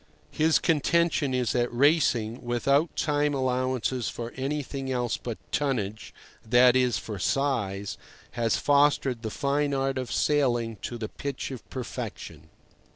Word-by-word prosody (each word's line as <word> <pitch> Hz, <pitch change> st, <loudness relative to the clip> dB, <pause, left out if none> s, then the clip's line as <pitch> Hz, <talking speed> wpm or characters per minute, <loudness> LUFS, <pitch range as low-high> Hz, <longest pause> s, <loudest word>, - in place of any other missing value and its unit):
His 155 Hz, +1 st, +3 dB
contention 160 Hz, -2 st, +2 dB
is 125 Hz, -3 st, 0 dB
that 120 Hz, -1 st, 0 dB
racing, 125 Hz, -4 st, +2 dB
without 140 Hz, +6 st, +1 dB
time 145 Hz, -1 st, +1 dB
allowances 130 Hz, -1 st, -1 dB
for 120 Hz, 0 st, -6 dB
anything 135 Hz, 0 st, -3 dB
else 125 Hz, -2 st, 0 dB
but 120 Hz, -3 st, -5 dB
tonnage—that 120 Hz, 0 st, +1 dB
is, 125 Hz, -2 st, +3 dB
for 105 Hz, -3 st, -6 dB
size—has 115 Hz, -1 st, -2 dB
fostered 140 Hz, -4 st, +2 dB
the 110 Hz, -, -3 dB
fine 140 Hz, +3 st, 0 dB
art 135 Hz, 0 st, 0 dB
of 130 Hz, -, -5 dB
sailing 120 Hz, -6 st, +1 dB
to 120 Hz, -, -6 dB
the 110 Hz, -2 st, -4 dB
pitch 140 Hz, -1 st, -5 dB
of 130 Hz, -4 st, -9 dB
perfection. 110 Hz, -, -7 dB
130 Hz, 125 wpm, -27 LUFS, 120-140 Hz, -, His